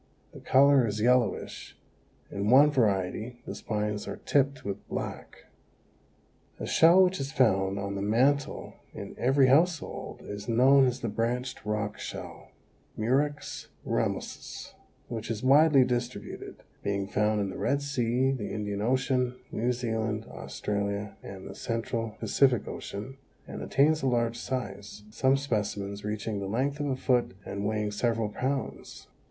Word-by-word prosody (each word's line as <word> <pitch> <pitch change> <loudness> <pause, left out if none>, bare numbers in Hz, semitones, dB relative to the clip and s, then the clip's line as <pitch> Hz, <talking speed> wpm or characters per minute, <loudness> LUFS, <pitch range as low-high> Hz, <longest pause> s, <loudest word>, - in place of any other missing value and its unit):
The - - -10
color 135 -2 +5
is 105 0 -3
yellowish; 120 -1 +1 0.5
in 100 +1 -1
one 140 +4 +7
variety 110 -1 0
the - - -5
spines 105 -1 -3
are - - -4
tipped 140 -1 +1
with 100 0 -5
black. - - -6 1.1
A - - -4
shell 170 +4 +6
which 185 -2 +1
is 135 0 -3
found 95 -7 +2
on 100 0 -3
the 100 - -3
mantel 130 +7 +1 0.2
in - - -7
every 135 +2 +4
household 160 +5 +1
is 105 +2 -7
known 130 +3 +6
as 125 +1 -2
the 120 - -2
Branched 120 +4 -2
Rock 105 -1 -2
Shell - - -8 0.5
(Murex 140 +6 -1 0.2
ramosus), - - -3 0.3
which 115 -2 -5
is 110 -1 -3
widely 140 0 +6
distributed, 120 -4 -4 0.2
being 100 -1 -1
found 105 +1 +1
in 100 -2 -1
the - - -7
Red 140 +1 +1
Sea, 130 -1 +1
the 125 -6 -3
Indian 105 -1 -3
Ocean, 125 +1 +1 0.2
New 120 +3 0
Zealand, 110 -2 -2
Australia 100 0 -3
and 95 -1 -9
the - - -7
Central 115 -1 -3
Pacific 130 -5 +2
Ocean, 115 +7 -6 0.3
and - - -7
attains 155 +3 +3
a 135 - 0
large 120 -2 +1
size, 105 -5 -5
some 130 +4 +3
specimens 105 -6 -2
reaching 105 0 -3
the 100 - -4
length 135 +8 -1
of 145 - -1
a 135 - 0
foot 125 -6 +1
and 100 +1 -3
weighing 105 -1 -1
several 115 0 0
pounds. 130 +5 -4
115 Hz, 145 wpm, -28 LUFS, 105-130 Hz, 1.1 s, one